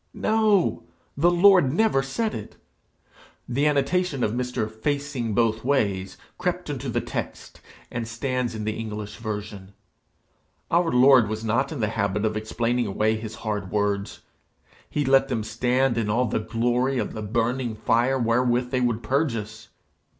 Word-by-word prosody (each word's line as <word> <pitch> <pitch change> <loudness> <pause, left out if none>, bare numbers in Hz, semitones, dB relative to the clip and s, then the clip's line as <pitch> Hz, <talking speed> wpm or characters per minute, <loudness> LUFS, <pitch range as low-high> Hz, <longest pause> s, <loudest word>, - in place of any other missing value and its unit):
No! 215 - +2 0.3
the 165 +5 +4
Lord 175 -5 +5
never 180 -4 +2
said 210 +12 -2
it. 105 - -7 0.9
The 140 +5 +1
annotation 150 0 +1
of 105 - +1
Mr. 125 -2 -2
Facingbothways 115 -4 -1 0.2
crept - - -2
into - - -4
the - - 0
text, - - -6 0.3
and 115 -1 -4
stands 125 +1 -2
in 110 - -4
the 110 0 -2
English 105 -2 -6
version. 105 -3 -6 1.0
Our 170 -1 +3
Lord 125 -3 +6
was 110 +1 -4
not 115 +7 +1
in 145 -6 -4
the 105 - +1
habit 105 -1 -1
of 110 0 0
explaining 115 +2 -1
away 110 +2 +1
his 110 0 -6
hard 105 -3 -2
words. 100 -1 -1 0.7
He 145 - -1
let 135 0 +4
them 115 -5 -2
stand 120 +3 +1
in 105 -2 -1
all 120 +4 +2
the 110 - -1
glory 120 +4 0
of 110 - -2
the 110 - -5
burning 120 +2 -1
fire 120 +5 +2
wherewith 125 +1 +1
they 130 -1 +1
would 120 -2 0
purge 140 -2 +1
us. 110 +1 -7
120 Hz, 150 wpm, -24 LUFS, 110-135 Hz, 1.0 s, Lord